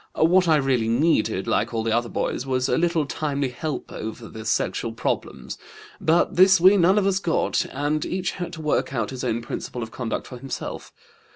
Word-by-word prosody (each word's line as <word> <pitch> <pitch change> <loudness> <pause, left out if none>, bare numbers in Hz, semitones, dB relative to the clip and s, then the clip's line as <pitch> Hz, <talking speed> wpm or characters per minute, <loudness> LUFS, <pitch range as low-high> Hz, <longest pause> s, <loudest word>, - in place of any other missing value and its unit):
What 180 +3 +4
I 160 - +5
really 135 -6 +1
needed, 115 - +1
like 115 +3 0
all 110 - 0
the 115 - -1
other 120 0 0
boys, - - -2
was 130 -1 0
a - - +2
little 170 -1 +1
timely 140 -2 -2
help 135 +2 -5
over 110 +1 -6
the 110 -1 -9
sexual 115 +1 -1
problems, 115 - -4 0.4
but 165 +2 +2
this 190 +1 +6
we 185 +4 +7
none 190 +1 +4
of 205 - +2
us 195 -1 +2
got, 170 -4 0
and 145 +2 -1
each 185 -1 -2
had 175 - -5
to 160 -1 -7
work 150 -2 0
out 115 -1 -1
his 130 -1 -6
own 115 -1 -1
principle 120 0 -5
of 110 - -8
conduct 120 -2 -4
for 125 - -9
himself. 135 0 -6
135 Hz, 200 wpm, -24 LUFS, 120-170 Hz, 0.4 s, we